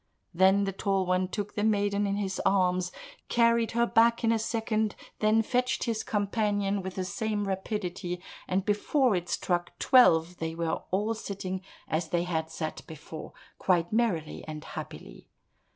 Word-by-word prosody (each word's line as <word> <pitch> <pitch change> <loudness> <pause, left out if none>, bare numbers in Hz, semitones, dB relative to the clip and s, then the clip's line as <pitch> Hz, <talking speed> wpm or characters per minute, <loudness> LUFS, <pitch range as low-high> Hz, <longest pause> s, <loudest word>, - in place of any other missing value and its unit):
Then 190 +3 +5
the 195 - -1
Tall 195 0 0
One 185 +1 +1
took 205 +2 -4
the 205 - -1
maiden 205 -1 +2
in 200 - 0
his 195 -2 -2
arms, 185 -2 +2 0.4
carried 235 -1 +3
her 235 +1 +3
back 235 0 +3
in 225 - +4
a 225 - +2
second, 220 -1 -1 0.2
then 215 +1 +3
fetched 250 +3 0
his 230 -2 -1
companion 205 -1 0
with 190 0 -6
the 185 - -2
same 210 +1 -2
rapidity, 185 -2 -3 0.3
and 185 +1 0
before 225 +3 +2
it 175 -1 -3
struck 175 -1 -1
twelve 175 - +5
they 160 0 -3
were 165 -1 -1
all 210 +4 0
sitting 190 -3 -5 0.3
as 155 +2 -1
they 175 -1 +1
had 160 -2 -2
sat 160 -1 -4
before, 155 0 -9 0.3
quite 175 0 +1
merrily 205 -10 0
and 155 -1 -6
happily. - - -9
195 Hz, 160 wpm, -29 LUFS, 180-220 Hz, 0.4 s, Then